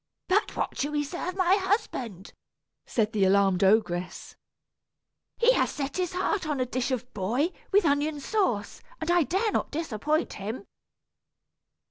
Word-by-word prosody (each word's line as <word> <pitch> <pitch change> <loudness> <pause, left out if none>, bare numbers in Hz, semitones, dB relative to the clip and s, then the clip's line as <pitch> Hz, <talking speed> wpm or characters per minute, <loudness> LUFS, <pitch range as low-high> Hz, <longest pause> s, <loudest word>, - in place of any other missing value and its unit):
"But 400 +3 +1
what - - -3
shall 290 +2 -1
we 295 0 +1
serve 350 +5 -4
my 375 0 +4
husband?" 320 - -2 0.5
said 220 -1 0
the 205 -2 +2
alarmed 195 0 +3
ogress. 190 -3 +1 1.0
"He 475 +1 +5
has - - +2
set 280 +1 -4
his 365 -1 -1
heart 370 -1 -1
on 295 -3 -1
a 255 - +1
dish 250 +1 -2
of 255 -1 -3
boy 240 - 0 0.2
with 405 -2 +4
onion 290 +1 +1
sauce, 285 - -1 0.2
and 315 - -1
I 350 0 +5
dare 390 +8 0
not - - -1
disappoint 305 +1 -1
him." 215 +5 -6
290 Hz, 150 wpm, -27 LUFS, 215-360 Hz, 1.0 s, He